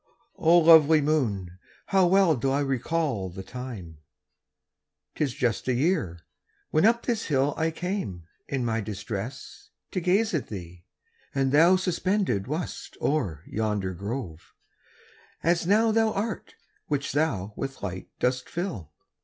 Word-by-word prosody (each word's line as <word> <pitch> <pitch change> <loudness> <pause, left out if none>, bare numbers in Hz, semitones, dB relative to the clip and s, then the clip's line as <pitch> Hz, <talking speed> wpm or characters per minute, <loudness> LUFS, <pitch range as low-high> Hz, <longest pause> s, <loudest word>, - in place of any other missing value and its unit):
O 170 +2 +6
lovely 160 -2 +7
moon, 105 - -1 0.3
how 190 -2 +3
well 190 -3 +4
do 135 +2 -1
I 140 +2 +1
recall 135 - -1
The 95 +2 -8
time,—'tis 110 - -9
just 120 -1 -1
a 130 - +2
year—when 155 - -1
up 235 +1 +2
this 230 -3 -1
hill 140 -1 +1
I 160 0 +1
came, 160 - -4 0.2
in 135 -3 -2
my 115 -1 0
distress, 105 +4 -6 0.2
to 185 - -1
gaze 195 +5 +2
at 155 - -1
thee: 90 -3 -9 0.5
And 135 -1 +1
thou 165 +6 +6
suspended 185 - 0
wast 155 +5 -5
o'er 95 - -1
yonder 105 -4 -2
grove, 100 -3 -6 0.9
As 170 +1 +2
now 220 +3 +4
thou 225 0 +3
art, 205 +1 -4 0.3
which 145 -1 -1
thou 110 - 0
with 135 -4 -5
light 95 -2 -5
dost 125 0 -1
fill. 115 - -4
135 Hz, 130 wpm, -26 LUFS, 105-170 Hz, 0.9 s, lovely